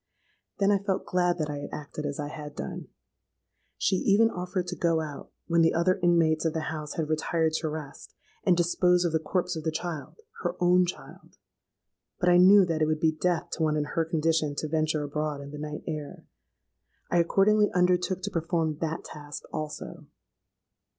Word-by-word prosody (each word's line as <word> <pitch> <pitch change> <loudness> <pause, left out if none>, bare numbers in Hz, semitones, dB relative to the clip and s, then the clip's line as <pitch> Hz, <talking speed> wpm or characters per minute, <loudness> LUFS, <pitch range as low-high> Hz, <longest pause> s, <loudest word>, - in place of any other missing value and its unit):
Then 200 -1 +3
I 200 - +3
felt 195 -1 -1
glad 175 -1 +1
that 155 -3 -1
I 145 - -4
had 145 - -6
acted 150 0 -5
as 145 0 -5
I 145 0 -3
had 150 -1 -8
done. - - -6 0.9
She 190 - +1
even 220 +4 +4
offered 180 0 -3
to 180 - -4
go 165 -2 +1
out, 150 -3 -7
when 170 -1 +2
the 165 - +3
other 185 +3 +2
inmates 165 -3 +3
of 160 -2 0
the 160 -1 -3
house 150 -1 -6
had 160 -2 -1
retired 160 +1 0
to 160 - -2
rest, 150 -2 -8 0.3
and 180 -3 +3
dispose 180 +1 +3
of 170 - +1
the 160 - +1
corpse 180 +3 -1
of 160 - -5
the 160 - 0
child—her 175 - -5
own 180 0 +4
child; 175 - -9 0.8
but 180 - +3
I 175 - +6
knew 190 +2 +7
that 165 -2 -1
it 155 - +3
would 155 0 0
be 160 -1 +3
death 175 +2 -1
to - - -4
one 155 -1 +2
in 150 - 0
her 165 - +2
condition 160 -2 0
to 155 - -3
venture 155 -1 0
abroad 150 0 -3
in 140 0 -9
the 150 - -7
night 150 0 -6
air. 150 -2 -6 0.9
I 175 - +4
accordingly 205 +5 +4
undertook 180 +1 +1
to 205 - -3
perform 165 -3 -1
that 160 0 -3
task 145 -1 -8
also. 155 -1 -6
165 Hz, 190 wpm, -27 LUFS, 155-180 Hz, 0.9 s, knew